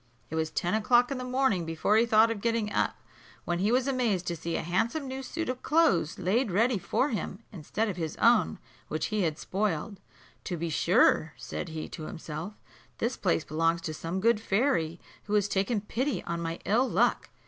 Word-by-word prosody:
It - - -3
was 160 0 0
ten 175 +3 -1
o'clock 240 +4 +3
in 270 - -2
the - - -4
morning 250 -7 +1
before 165 +5 +1
he 230 +2 +4
thought 225 0 +5
of 215 -3 -4
getting 230 -2 0
up, - - +1 0.5
when 175 0 -1
he 205 +4 +2
was 255 +2 +2
amazed 235 -9 0
to 170 - -2
see 165 +1 -4
a - - -1
handsome 230 - -1
new 265 +1 -5
suit 330 +5 -4
of 255 0 -3
clothes 225 - +2
laid 205 +7 +1
ready 225 +4 +2
for 265 - 0
him, 215 -2 -4
instead 210 +4 -2
of 195 -4 -4
his 160 -3 -3
own, 235 +1 +4 0.3
which - - -2
he 215 - +1
had 160 -4 0
spoiled. 200 0 -2 0.5
"To 175 - -3
be 165 0 -3
sure," - - +3
said 75 - -5
he 160 -1 -5
to 155 -3 -7
himself, 160 +5 -6 0.4
"this 235 +3 -1
place 170 -4 0
belongs 165 +2 0
to 155 - -4
some 165 +4 -4
good 230 +2 +3
fairy, 195 - 0 0.3
who 210 - -1
has 205 -1 +3
taken 200 +2 0
pity 255 +7 -2
on 170 0 -3
my 165 0 -3
ill 235 +7 +2
luck." - - +1
205 Hz, 205 wpm, -29 LUFS, 170-235 Hz, 0.5 s, thought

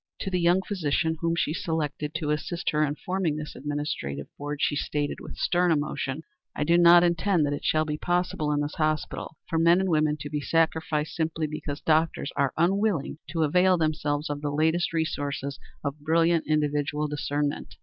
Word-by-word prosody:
To 195 - -3
the 180 - +1
young 175 +2 +3
physician 160 -4 -1
whom 165 0 +1
she 155 - 0
selected 150 -3 -3
to 150 -2 -1
assist 170 +3 -2
her 150 0 +2
in 145 -1 -1
forming 180 -2 -1
this 150 0 -6
administrative 145 - -3
board 145 0 -5
she 145 - +1
stated, 145 0 -2
with - - -9
stern 175 0 +2
emotion: 145 -1 -1 0.3
"I - - 0
do 170 +3 +3
not 175 0 +8
intend 170 -1 +2
that 145 - -1
it 145 - -5
shall 155 0 +2
be 150 -1 -3
possible 175 -3 0
in 145 0 +1
this 145 0 -3
hospital 155 0 -2
for 165 - 0
men 170 +2 +5
and 190 0 0
women 155 -2 +2
to 145 - -5
be 150 -1 -2
sacrificed 160 -1 0
simply 160 -1 -1
because 150 -1 -5
doctors 160 -2 +1
are 140 -2 +1
unwilling 180 -3 +1
to 165 0 0
avail 180 +4 +4
themselves 150 -2 0
of 145 0 -4
the 150 - -1
latest 160 +4 +1
resources 145 -4 -2 0.2
of 140 +1 -3
brilliant 165 +2 +2
individual 150 0 0
discernment. 145 0 -2
155 Hz, 185 wpm, -26 LUFS, 145-170 Hz, 0.3 s, not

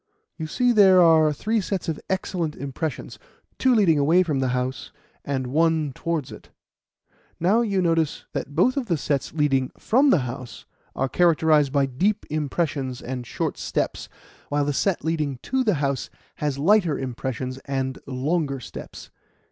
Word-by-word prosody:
You 160 -2 -5
see 245 +9 +2
there 195 -5 +6
are 160 -3 +5
three 215 +9 -1
sets 190 -1 -3
of 160 -3 -2
excellent 180 -4 -2
impressions 140 +3 -5 0.4
two 260 -1 +4
leading 175 -9 +4
away 165 +6 +4
from 150 -6 -1
the 130 - +1
house, 125 +1 -3 0.3
and 135 -2 -2
one 160 +3 +1
set - - -10
towards 165 -5 -3
it. - - -12 0.9
Now, 195 +7 +3
you 200 -5 0
notice 165 -3 0
that 145 - -5
both 255 - +3
of 260 -4 -1
the 170 -5 +1
sets 140 -1 -2
leading 135 -4 +1
from 265 +6 +3
the 180 - +4
house 125 -1 -8 0.3
are 135 - 0
characterized 155 -3 +3
by 140 -1 +2
deep 190 +12 0
impressions 145 -4 -2
and 125 -1 -6
short - - -3
steps, - - -2 0.4
while 145 0 +1
the 145 - 0
set 185 +5 0
leading 155 -5 -1
to 265 0 0
the 210 -6 +2
house 140 -2 -2 0.3
has 145 -2 -2
lighter 175 0 +3
impressions 130 0 -4
and 135 -1 -2
longer 140 +2 -1
steps. 125 - -10
155 Hz, 165 wpm, -24 LUFS, 135-180 Hz, 0.9 s, there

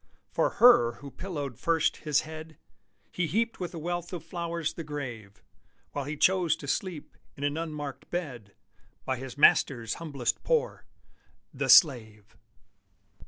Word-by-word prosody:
For - - +1
her 175 - +7
who 140 +3 -11
pillowed 145 - -6
first 165 -2 +1
his 150 -2 +1
head 160 0 -10 0.5
He 175 -2 -1
heaped 230 +6 -1
with 180 -2 -4
a - - -5
wealth 175 +1 -4
of 170 -3 -5
flowers 170 -2 -3
the 165 - -6
grave, 120 -10 -7 0.5
While 145 -2 -4
he 150 +2 -5
chose 180 -1 +3
to 140 - -10
sleep 170 0 -3 0.2
in 140 - -6
an 145 0 0
unmarked 150 -4 -6
bed, 125 - -5 0.5
By 130 - -1
his 130 +2 -8
Master's 120 -5 +4
humblest 140 -7 -2
poor - - 0 0.7
the - - -3
slave! 110 - +5
150 Hz, 145 wpm, -28 LUFS, 130-170 Hz, 0.7 s, her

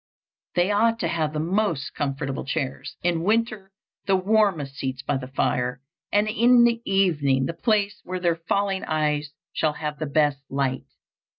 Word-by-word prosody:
They 180 +3 +3
ought 225 +2 +3
to - - +1
have 155 -3 -1
the 150 - -3
most 170 -3 0
comfortable 135 -1 -3
chairs, 135 -1 -4
in 170 -1 +1
winter 215 0 0 0.4
the 195 - +4
warmest 190 -7 +2
seats 135 -1 -4
by 140 0 0
the 130 -1 -6
fire, 125 -1 -1 0.3
and 205 +1 +3
in 240 +3 +5
the 235 -1 +3
evening 150 -9 +2
the 165 - -3
place 205 +3 0
where 185 0 -4
their 170 -2 +2
failing 200 -1 +1
eyes 150 -2 0 0.2
shall 155 -1 +1
have 150 0 -5
the 155 - -2
best 145 -1 +2
light. 135 -1 -1
165 Hz, 165 wpm, -24 LUFS, 140-200 Hz, 0.4 s, in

